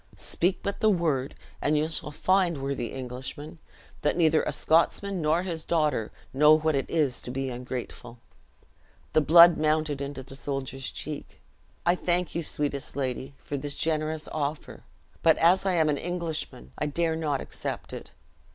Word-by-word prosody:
Speak 180 +2 0
but 200 - -3
the 215 - +4
word, 155 -9 0 0.3
and 150 +1 +2
you 155 +1 +1
shall 160 -2 -2
find, 180 0 +1
worthy 135 -4 -2
Englishman, 130 +5 -7 0.4
that 150 - +1
neither 160 -2 +4
a - - -2
Scotsman, 180 +3 +1
nor 160 +3 +2
his 165 -4 -3
daughter, 150 -9 0 0.2
know 150 +3 +6
what 155 0 +1
it 135 -1 -1
is 145 -7 +1
to - - -7
be 135 +1 -3
ungrateful." 125 -1 -6 1.0
The 155 - +5
blood 170 +2 +8
mounted 155 -2 +1
into 140 -1 -5
the 135 - -11
soldier's 135 -1 -4
cheek. 150 -1 -7 0.5
"I 175 - +5
thank 180 0 -1
you, 170 - -1
sweetest 145 -4 -1
lady, 135 0 -3
for 145 - -5
this 140 +1 -3
generous 155 -1 -1
offer; 150 0 -4 0.4
but, 160 - +5
as 185 +4 +4
I 190 - +2
am 160 -3 +3
an 150 -1 +1
Englishman, 165 - -4
I - - 0
dare 165 +2 0
not 150 -4 -1
accept - - -5
it. - - -7
155 Hz, 165 wpm, -27 LUFS, 135-165 Hz, 1.0 s, blood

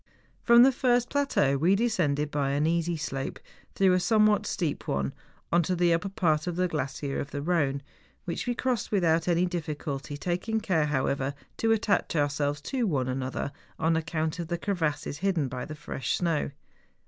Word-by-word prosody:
From 235 0 +7
the 270 - +6
first 245 -1 +1
plateau 275 - +2
we 175 +7 +3
descended 165 -10 +1
by 140 -2 0
an 145 +2 +1
easy 170 +1 +1
slope, 135 -3 -4 0.4
though 190 -2 +4
a 180 - +3
somewhat 215 +2 +3
steep 160 -5 -2
one, 70 -1 -1 0.4
on 170 - +5
to 180 +3 -1
the 175 -1 +3
upper 180 +4 -1
part 170 -6 +1
of 175 - -2
the 180 +1 +1
glacier 140 -3 -3
of 140 - -4
the 145 - -4
Ehone, 145 -5 +1 0.4
which 170 +7 -3
we 245 - 0
crossed 250 -3 -1
without 170 -5 +2
any 175 0 +3
difficulty, 150 -4 -4
taking 180 +8 -1
care, 165 -8 +1
however, 140 -1 0 0.2
to 225 - +2
attach 210 -5 +1
ourselves 145 0 0
to 250 - -1
one 135 -8 0
another, 130 +1 -3 0.3
on 160 +1 +2
account 160 0 -2
of 170 - -3
the 175 - -2
crevasses 160 -6 -2
hidden 180 -6 +1
by 125 0 -5
the 155 - -7
fresh 150 -2 -3
snow. 165 -5 0
165 Hz, 180 wpm, -28 LUFS, 145-185 Hz, 0.4 s, From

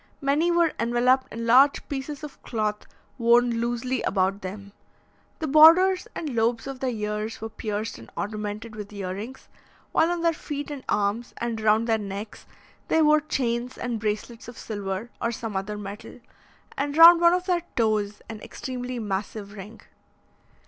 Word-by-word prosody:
Many 295 +4 +1
were 340 -2 +3
enveloped 250 +3 +2
in 230 +1 -5
large 260 +5 +5
pieces 285 +2 -5
of 300 - -9
cloth 215 -2 -3 0.3
worn 235 0 +4
loosely 240 +2 -1
about 190 +1 0
them. 200 +1 -8 0.6
The 320 - -3
borders 330 +6 +6
and 300 -5 -4
lobes 230 0 +1
of 270 -1 -6
their 265 - -1
ears 210 -1 -3
were 225 - -5
pierced 215 - -4
and 115 - -13
ornamented 210 +1 -4
with 210 -1 -8
ear 195 -3 -4
rings, 225 +7 -8 0.4
while 325 - +3
on 350 -1 -1
their 335 -1 +3
feet 290 -1 -6
and 280 -3 -7
arms, 210 +4 -1
and 230 -2 -3
round 215 +1 +3
their 225 -1 +1
necks, 205 +1 -7 0.4
they 320 - +3
wore 305 0 +5
chains 250 -4 -2
and 240 -2 -3
bracelets 215 +2 -4
of 240 - -10
silver, 205 +1 -5
or 230 - 0
some 225 -3 -5
other 200 +2 -3
metal, 205 +3 -9 0.6
and 285 +2 -2
round 335 +1 +10
one 340 0 +6
of 360 0 0
their 355 -2 +1
toes 215 -3 0
an 220 -2 -8
extremely 250 -1 -6
massive 205 -1 -4
ring. 210 +2 -10
230 Hz, 165 wpm, -25 LUFS, 210-275 Hz, 0.6 s, round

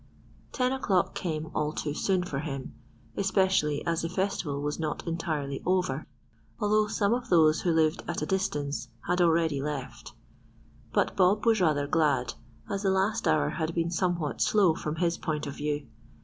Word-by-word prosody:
Ten 250 -1 +1
o'clock 200 -9 +1
came 160 -3 -3
all 150 0 -1
too 145 - -3
soon 185 +3 +1
for 145 -6 -3
him, 135 -3 -5 0.4
especially 190 -6 +1
as 170 -1 0
the 165 - -2
festival 180 -6 -1
was 145 +2 -3
not 155 -2 -3
entirely 155 -5 -2
over, 180 -6 0 0.5
although 215 0 +2
some 205 0 +1
of 245 0 -3
those 155 -3 +5
who 180 - 0
lived 160 0 +2
at 170 - -2
a - - 0
distance 150 -6 -1 0.2
had 180 +1 +2
already 165 -4 +3
left; 140 -3 -5 0.8
but - - +1
Bob 195 +3 +3
was 225 -3 +4
rather 150 -4 +2
glad, 145 -5 +1 0.3
as 200 -1 -2
the 195 - +1
last 190 0 +1
hour 155 -2 +3
had 160 +1 -3
been 170 0 0
somewhat 175 -4 -1
slow, 195 -6 +4
from 155 -1 -4
his 170 0 0
point 155 -2 -2
of 140 - -5
view. 145 0 -2
165 Hz, 170 wpm, -28 LUFS, 150-190 Hz, 0.8 s, those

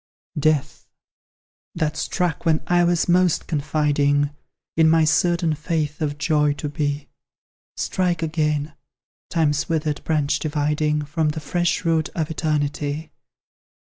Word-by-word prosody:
Death! 150 -1 0 0.9
that 155 -2 -1
struck 175 -1 -1
when 160 -1 +2
I 175 +1 +3
was 175 -1 +2
most 180 -1 +3
confiding. 145 -1 +1 0.4
In 160 0 +5
my 165 0 +5
certain 170 +1 +2
faith 155 -1 -2
of 145 -1 -1
joy 150 -1 +2
to 145 0 -5
be 145 -1 -2 0.7
Strike 175 -3 0
again, 150 -1 -1 0.6
Time's 150 -4 +1
withered 155 -2 -1
branch 150 -2 +1
dividing 150 0 0
From 155 +1 0
the 155 +1 -3
fresh 175 +3 -1
root 160 -1 +1
of 160 -1 -2
Eternity! 150 -1 -2
155 Hz, 120 wpm, -22 LUFS, 150-165 Hz, 0.9 s, In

